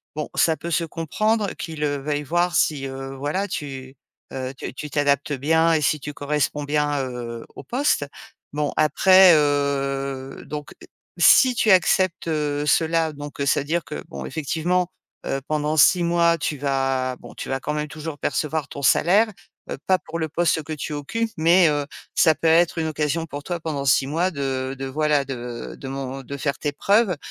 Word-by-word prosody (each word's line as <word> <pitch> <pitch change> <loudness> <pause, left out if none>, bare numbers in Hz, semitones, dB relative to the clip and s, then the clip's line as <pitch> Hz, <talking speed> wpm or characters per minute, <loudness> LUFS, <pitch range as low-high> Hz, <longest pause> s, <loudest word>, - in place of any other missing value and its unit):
bon, 150 0 -4
ça 160 -1 +3
peut 170 - -6
se 165 0 +1
comprendre 205 +7 -1
qu'ils, 160 -3 -5
heu, 145 -1 0
veuillent 145 +1 -2
voir 175 +4 0
si, 140 -3 +1
heu, 135 0 -7
voilà, 170 +9 -2
tu, 135 -2 -6 0.4
heu, 130 0 -4
tu - - -6
tu 150 +2 -7
t'adaptes 145 0 +1
bien 160 +4 +2
et 155 - +2
si 150 +1 +1
tu 150 +1 -7
corresponds 145 0 -1
bien, 145 -1 0
heu, 120 -2 -6
au - - -9
poste. 250 - 0 0.5
Bon, 150 -1 -1
après, 185 +4 +6
heu, 140 -2 -1
donc 150 0 -7 0.5
si 255 -1 +6
tu 230 -1 +1
acceptes, 185 -2 +3
heu, 150 -2 -1
cela 160 +1 +2
donc, 145 0 -8
heu, - - +1
c'est-à-dire 150 +4 +1
que 75 - -7
bon, 70 -1 -7
effectivement, 165 - -1 0.4
heu, 135 - -2
pendant 150 0 0
6 165 +4 +5
mois, 170 0 +3
tu 150 -1 -2
vas, 135 -2 -1
bon, - - -12
tu - - -7
vas 135 - -1
quand 150 +3 -3
même 150 0 -3
toujours 155 0 -7
percevoir 155 -1 -2
ton 140 - -7
salaire, 190 - +4 0.4
heu, - - -4
pas 185 -1 +3
pour 165 +1 -7
le 160 -1 -2
poste 165 0 +1
que 155 - -9
tu 150 0 -5
occupes, 225 +11 -2
mais, 170 +2 +5
heu, 145 -1 0 0.3
ça 160 -3 +5
peut 165 - -1
être 165 +1 +4
une 160 -1 0
occasion 155 +1 -1
pour 145 -2 -7
toi 175 -1 -3
pendant 155 -4 -3
6 135 0 +3
mois 170 +6 0
de 135 -3 -3
de 135 - -3
voilà, 150 +1 +1
de 120 -3 -6
de 135 - -8
mon 135 0 -5
de 140 +2 -7
faire 140 0 -2
tes 145 - -2
preuves, 200 +3 +2
150 Hz, 190 wpm, -23 LUFS, 140-165 Hz, 0.5 s, après